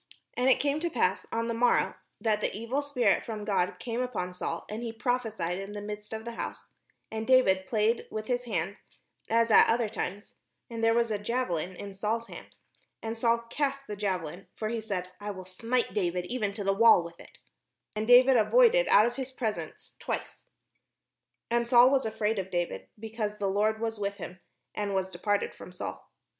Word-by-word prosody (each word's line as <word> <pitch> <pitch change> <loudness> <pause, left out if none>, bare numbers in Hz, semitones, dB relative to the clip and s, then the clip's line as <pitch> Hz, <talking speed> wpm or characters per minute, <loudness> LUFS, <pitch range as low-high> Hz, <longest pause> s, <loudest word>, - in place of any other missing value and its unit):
And 250 +1 +2
it 260 - +5
came 285 +1 +1
to 340 +2 -1
pass 220 - 0
on 230 0 -1
the 230 - -1
morrow, 240 +1 +2 0.3
that 215 -1 +1
the - - 0
evil 235 +6 -1
spirit 285 -4 +2
from 215 -2 -5
God 185 -4 +1
came 235 +5 -3
upon 210 -8 -3
Saul, 170 -2 -4
and 215 +2 -5
he 235 -1 -3
prophesied 225 -7 -2
in 195 +1 -7
the 205 - -5
midst 210 0 -7
of 220 0 -5
the 235 - -4
house: 230 - -6 0.4
and 220 0 -4
David 190 -8 +4
played 220 +1 +1
with 215 0 -4
his 245 +1 -1
hand, 195 -3 -2 0.5
as 230 0 +3
at - - +8
other 230 0 +2
times: 205 -1 -5 0.3
and 230 -1 -4
there 225 0 +4
was 235 -1 +2
a 210 - -1
JaveUn 200 -6 -2
in 200 +2 -8
Saul's 220 +4 -2
hand. - - -11 0.5
And 225 0 -3
Saul 235 0 +1
cast 275 -1 -1
the 210 - -5
javelin; 185 -3 -3
for 215 - -3
he 230 0 -2
said, 185 -4 -4
"I 205 0 -5
will 185 -2 -6
smite 230 +7 -1
David 180 -3 -1
even 215 -1 -2
to 205 - -4
the 195 0 +2
wall 210 -4 +6
with 170 0 -11
it." - - -15 0.6
And 215 +1 -2
David 250 +1 +7
avoided - - +5
out 210 - +6
of 240 +2 -2
his 265 -1 -4
presence 225 -5 -5
twice. - - -5 1.1
And 235 0 +2
Saul 245 +1 +7
was 270 -4 +2
afraid 220 -1 -1
of 190 0 -4
David, 175 -2 -2
because 215 -1 -4
the 205 - -2
Lord 210 +3 +1
was 225 -1 -3
with 200 0 -2
him, 180 -1 -8 0.3
and 205 -1 -2
was 190 0 -1
departed 205 +3 -1
from - - -11
Saul. 180 - -7
220 Hz, 200 wpm, -29 LUFS, 200-235 Hz, 1.1 s, at